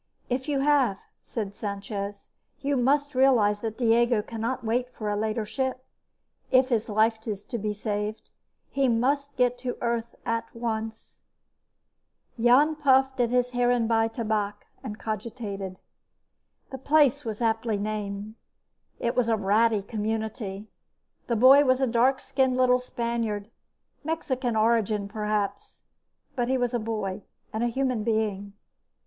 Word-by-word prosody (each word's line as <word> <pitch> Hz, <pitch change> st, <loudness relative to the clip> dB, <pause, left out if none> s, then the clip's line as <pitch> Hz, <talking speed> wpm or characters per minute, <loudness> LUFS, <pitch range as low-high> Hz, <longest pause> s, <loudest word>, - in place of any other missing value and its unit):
"If 260 Hz, +4 st, -1 dB
you 280 Hz, -2 st, +1 dB
have," 275 Hz, -8 st, +3 dB, 0.2 s
said 205 Hz, -4 st, -5 dB
Sanchez, 200 Hz, 0 st, -5 dB, 0.3 s
"you 280 Hz, +1 st, 0 dB
must 285 Hz, +3 st, +2 dB
realize 245 Hz, -6 st, +4 dB
that 220 Hz, -1 st, -4 dB
Diego 235 Hz, -2 st, +3 dB
cannot 230 Hz, +3 st, -3 dB
wait 245 Hz, +3 st, 0 dB
for 210 Hz, -3 st, -4 dB
a -, -, 0 dB
later 215 Hz, +1 st, -1 dB
ship, 260 Hz, +2 st, -3 dB, 0.6 s
if 255 Hz, 0 st, +4 dB
his 225 Hz, -4 st, 0 dB
life 220 Hz, +2 st, +1 dB
is 205 Hz, -2 st, -3 dB
to 235 Hz, -, -5 dB
be 210 Hz, +1 st, -1 dB
saved. 210 Hz, 0 st, -4 dB, 0.4 s
He 275 Hz, -1 st, +2 dB
must 275 Hz, +4 st, +1 dB
get 245 Hz, 0 st, +2 dB
to 250 Hz, -1 st, -4 dB
Earth 235 Hz, -1 st, -2 dB
at 230 Hz, 0 st, -1 dB
once." 225 Hz, -1 st, -5 dB, 1.2 s
Jan 270 Hz, +6 st, +5 dB
puffed 265 Hz, -2 st, +3 dB
at 240 Hz, -1 st, +3 dB
the 250 Hz, +1 st, +3 dB
Heerenbaai 245 Hz, -2 st, +2 dB
Tabak 215 Hz, -3 st, -2 dB, 0.2 s
and 210 Hz, 0 st, -6 dB
cogitated. 210 Hz, -4 st, -5 dB, 0.9 s
The 265 Hz, -, -6 dB
place 290 Hz, 0 st, +3 dB
was 220 Hz, -3 st, -4 dB
aptly 225 Hz, -2 st, 0 dB
named. 205 Hz, 0 st, -4 dB, 0.7 s
It 235 Hz, -, -1 dB
was 245 Hz, -2 st, +2 dB
a 225 Hz, -, +3 dB
ratty 210 Hz, +1 st, +2 dB
community. 215 Hz, -1 st, -4 dB, 0.6 s
The 235 Hz, -, +1 dB
boy 265 Hz, +5 st, +7 dB
was 255 Hz, -2 st, +3 dB
a 265 Hz, -, +3 dB
dark 250 Hz, +2 st, +3 dB
skinned 265 Hz, -1 st, +1 dB
little 250 Hz, 0 st, +4 dB
Spaniard 235 Hz, -4 st, -2 dB
of 225 Hz, -, -31 dB, 0.5 s
Mexican 260 Hz, -6 st, -2 dB
origin, 215 Hz, -2 st, +2 dB
perhaps. 210 Hz, -1 st, -3 dB, 0.5 s
But 245 Hz, -3 st, 0 dB
he 260 Hz, +1 st, +2 dB
was 245 Hz, -1 st, -1 dB
a 240 Hz, -, +1 dB
boy, 215 Hz, -3 st, -3 dB, 0.3 s
and 220 Hz, +2 st, -1 dB
a -, -, +2 dB
human 255 Hz, -2 st, -1 dB
being. 210 Hz, -3 st, -1 dB
230 Hz, 140 wpm, -26 LUFS, 215-255 Hz, 1.2 s, boy